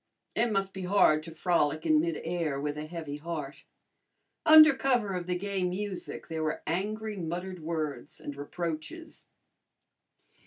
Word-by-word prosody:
It 235 0 +1
must 195 -1 0
be 190 - -6
hard 180 -5 +4
to 165 +1 -9
frolic 160 -2 +1
in 155 -1 +5
midair 165 -2 -1
with 145 +1 -2
a 150 +1 -5
heavy 160 -3 -6
heart. 150 -2 -6 0.8
Under 310 -1 +10
cover 245 -7 +1
of 180 -1 -3
the 180 0 0
gay 195 0 -2
music 185 +1 -4
there 160 -1 -3
were 155 0 -2
angry 210 +5 -2
muttered 180 +2 -4
words 155 -3 -4
and 145 - -6
reproaches. 165 - -6
170 Hz, 145 wpm, -29 LUFS, 155-195 Hz, 0.8 s, Under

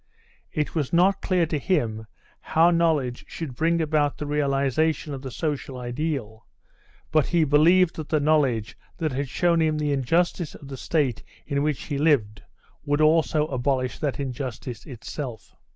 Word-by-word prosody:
It 150 -2 -2
was 150 -5 -1
not 190 +3 +3
clear 180 -3 +2
to 155 -2 -2
him 115 - -1 0.3
how 165 +2 +3
knowledge 155 -8 +1
should 160 -6 -6
bring 165 +6 +1
about 150 -2 +1
the 150 - -4
realisation 145 +1 0
of 135 - -6
the 135 - -6
social 140 -1 -3
ideal, 125 -3 -4 0.6
but 155 -3 +3
he 170 -2 +2
believed 160 +5 +4
that 155 -2 -6
the 155 - +2
knowledge 140 -8 +1 0.2
that 155 -2 -1
had 135 +1 -3
shown 170 +2 +2
him 155 -1 +1
the 150 -1 0
injustice 165 +5 0
of 140 - -12
the 135 - -6
state 140 -5 0 0.2
in 140 -2 -1
which 150 -2 -1
he 145 -3 -3
lived 125 -9 +2 0.4
would 145 +1 0
also 155 0 +3
abolish 130 -2 -1
that 145 -3 -2
injustice 125 -3 -5
itself. 125 -1 -7
150 Hz, 160 wpm, -25 LUFS, 130-160 Hz, 0.6 s, believed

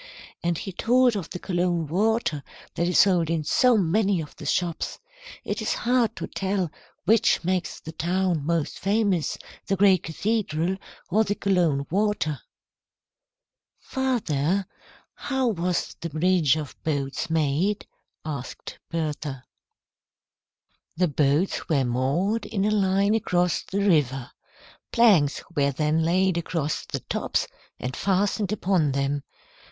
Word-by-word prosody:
And 170 -1 0
he 195 - -5
told 245 +5 +3
of 190 -5 -4
the - - -5
Cologne 175 -2 0
water 195 -1 0 0.3
that 170 - 0
is 180 - +2
sold 180 -5 +4
in 165 -2 0
so 245 +10 +4
many 195 +1 +2
of 155 -2 -7
the 150 - -7
shops. 170 +2 -1 0.5
It - - -3
is - - 0
hard 240 -2 +2
to - - -4
tell 190 -4 -2 0.3
which 220 -1 +3
makes 185 +1 -1
the 160 - -8
town 175 -1 0
most 165 0 -1
famous, 200 -5 +1 0.3
the 195 - +1
great 195 -2 +5
cathedral 185 -1 -1 0.3
or 215 +4 +4
the 205 -1 -1
Cologne 170 -9 +1
water." 190 -7 0 1.4
"Father, 200 - 0 0.5
how 265 -3 -1
was 180 -3 -1
the 170 - -3
bridge 160 -1 +3
of 150 -3 -5
boats 140 +1 -2
made?" 160 +6 +1 0.4
asked 140 -5 -6
Bertha. 150 -5 -3 1.5
"The 180 -1 +2
boats 150 +7 +1
were 140 -5 +2
moored 170 - 0
in 200 -3 -1
a 215 - +2
line 200 0 +2
across 180 -5 +1
the 200 +1 -3
river. 135 -7 +1 0.6
Planks 195 - +4
were 140 -2 +2
then 150 +3 +1
laid 180 +1 +2
across 160 -2 -2
the - - -4
tops - - -1 0.3
and 125 +1 -4
fastened 200 +1 0
upon 180 -8 +1
them. 140 +1 0
175 Hz, 130 wpm, -25 LUFS, 155-200 Hz, 1.5 s, great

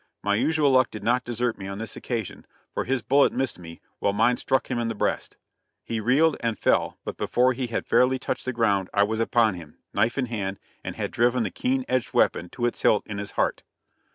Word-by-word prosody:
My 100 - +1
usual 150 +6 +2
luck 130 -1 +4
did 110 - -8
not 125 +2 +2
desert 120 -2 -2
me 95 - -6
on 100 0 -5
this 110 0 -6
occasion, 115 -6 -5 0.3
for - - -2
his 130 -1 -1
bullet 140 +1 +4
missed 130 -7 -2
me, 85 -1 -11 0.2
while 100 - +1
mine 115 +4 +3
struck 130 -1 0
him 120 - 0
in 120 - -1
the 115 - -3
breast. - - -2 0.5
He 115 - -3
reeled 140 +8 +3
and 115 -3 -1
fell, - - +1
but - - -5
before 125 +1 +2
he 125 0 -3
had 115 - -3
fairly 130 +1 +3
touched 130 - -4
the 130 - -1
ground 100 -6 +1
I 100 - +5
was 110 +2 -1
upon 115 -2 +3
him, 85 -4 -11 0.2
knife 115 +4 +1
in 135 - +1
hand, 100 -5 -4 0.2
and - - -5
had - - -3
driven 120 +1 +2
the 100 - -3
keen 130 0 -1
edged 130 -1 -1
weapon 85 - +2
to 120 - -3
its 120 - -2
hilt 105 - +3
in 105 -1 -5
his 100 0 -6
heart. - - 0
115 Hz, 230 wpm, -25 LUFS, 105-125 Hz, 0.5 s, I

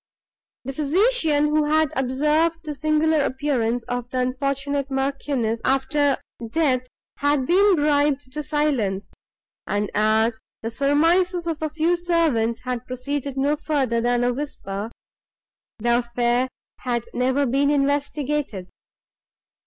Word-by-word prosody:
The 270 +2 -5
physician, 310 - +2
who 305 0 +2
had 310 0 +2
observed 300 +6 +1
the 305 -2 -4
singular 310 +1 +2
appearance 250 -4 -1
of 245 0 -4
the 255 - -4
unfortunate 275 +2 -1
Marchioness, 270 -4 -1
after 275 +1 +2 0.3
death, 255 -3 +1 0.3
had 285 -2 +1
been 390 +5 +4
bribed 290 -3 +1
to 300 - -4
silence; 245 - -1 0.5
and, 205 0 -1
as 220 +2 +2 0.2
the 225 - -3
surmises 335 +7 +2
of 325 -2 -3
a 310 - -1
few 320 +3 +1
of 350 - -1
the - - -7
servants 295 -10 +1
had 250 -1 -4
proceeded 275 +2 -4
no 285 +2 +2
further 275 -6 0
than 245 0 +1
a 245 0 +2
whisper, 220 -7 -5 0.9
the 235 +2 +2
affair 240 +1 0 0.3
had 240 -2 -2
never 260 +3 +1
been 275 +3 +2
investigated. 285 -7 -1
275 Hz, 130 wpm, -23 LUFS, 245-300 Hz, 0.9 s, been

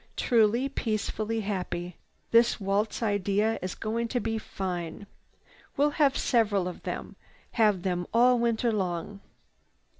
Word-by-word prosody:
"Truly, 235 +2 +3
peacefully 220 -3 -2
happy. 180 -3 -4 0.4
This 235 0 +4
waltz 205 +3 -1
night 220 - +2
idea 205 +3 +1
is 185 0 -4
going 230 +2 -2
to 245 +1 -1
be 225 -1 -2
fine. 180 -2 -5 0.7
We'll 290 +1 +3
have 290 -2 +2
several 205 -6 +2
of 180 - -7
them, - - -5 0.4
have 210 -6 +2
them 180 -2 -1
all 245 +2 +5
winter 235 0 +1
long." 195 0 -3
215 Hz, 130 wpm, -28 LUFS, 190-235 Hz, 0.7 s, all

